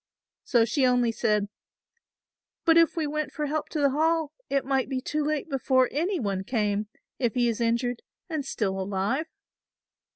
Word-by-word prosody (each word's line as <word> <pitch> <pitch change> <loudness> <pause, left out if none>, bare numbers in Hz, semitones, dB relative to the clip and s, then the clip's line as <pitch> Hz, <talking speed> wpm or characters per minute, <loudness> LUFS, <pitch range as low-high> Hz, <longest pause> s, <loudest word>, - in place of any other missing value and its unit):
So 235 -4 +3
she 250 +5 0
only 250 -2 +3
said; 210 -2 +1 1.2
"But 330 - +6
if 330 -1 +5
we 320 - +1
went 300 -1 -2
for 300 - -3
help 300 +1 -2
to 310 - -3
the 280 -2 +3
Hall 320 +1 +1 0.2
it 275 0 0
might 270 -1 0
be 265 -2 -1
too 300 +3 -2
late 300 0 -1
before 260 -3 +2
any 345 +6 0
one 195 -5 -2
came, 210 -2 0 0.3
if 240 -5 0
he 245 -1 +3
is 230 0 -1
injured 235 +1 0 0.3
and 315 -5 -2
still 195 -7 -2
alive." 200 +10 -1
260 Hz, 170 wpm, -27 LUFS, 230-300 Hz, 1.2 s, But